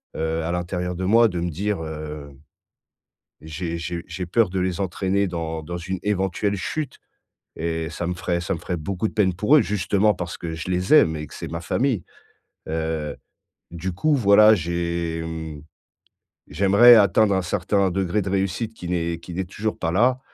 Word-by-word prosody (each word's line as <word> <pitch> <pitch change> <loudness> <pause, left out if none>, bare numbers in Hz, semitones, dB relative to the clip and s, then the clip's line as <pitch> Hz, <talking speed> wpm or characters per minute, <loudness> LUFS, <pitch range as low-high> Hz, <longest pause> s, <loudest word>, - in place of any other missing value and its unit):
heu, 80 0 -1
à 85 - -2
l'intérieur 90 0 -3
de 95 +1 -3
moi, 115 +4 +5
de 90 - -3
me 85 0 -1
dire: 100 +2 -2
«Heu, 75 -2 -7 1.1
j'ai 85 +2 -5
j'ai 85 +1 -4
j'ai 90 +1 -5
peur 105 +3 +2
de 95 0 -1
les 90 0 -1
entraîner 95 +1 0
dans 80 -2 -4
dans 85 +3 -5
une 95 +2 -4
éventuelle 100 0 0
chute 140 +8 -4 0.6
et 80 0 -2
ça 85 +2 -4
me 90 - -1
ferait 85 -1 -2
ça - - -2
me - - -5
ferait 90 - -3
beaucoup 95 +6 -2
de - - -13
peine 95 -5 +2
pour 105 - +4
eux, - - +6
justement 105 +1 +1
parce 90 -1 -5
que 80 -1 -5
je 80 +3 -5
les 90 +7 0
aime 80 - +5
et 75 - -5
que - - -13
c'est - - -7
ma 85 0 -4
famille.» 115 +2 0 0.7
heu, 80 -2 -2 0.6
du 85 +2 -4
coup, 150 - +2
voilà, 105 -2 +6
j'ai 85 -1 -2
mmh, 80 -2 -6 0.9
j'aimerais 100 +9 +7
atteindre 100 0 +4
un 95 - +1
certain 95 +2 0
degré 95 +2 0
de 95 - -3
réussite 100 +3 -1
qui 90 - -8
n'est 85 -1 -1
qui 85 - -10
n'est 95 +1 -2
toujours 105 +4 -4
pas 80 -1 -1
là, 125 +7 +3
90 Hz, 190 wpm, -23 LUFS, 85-100 Hz, 1.1 s, j'aimerais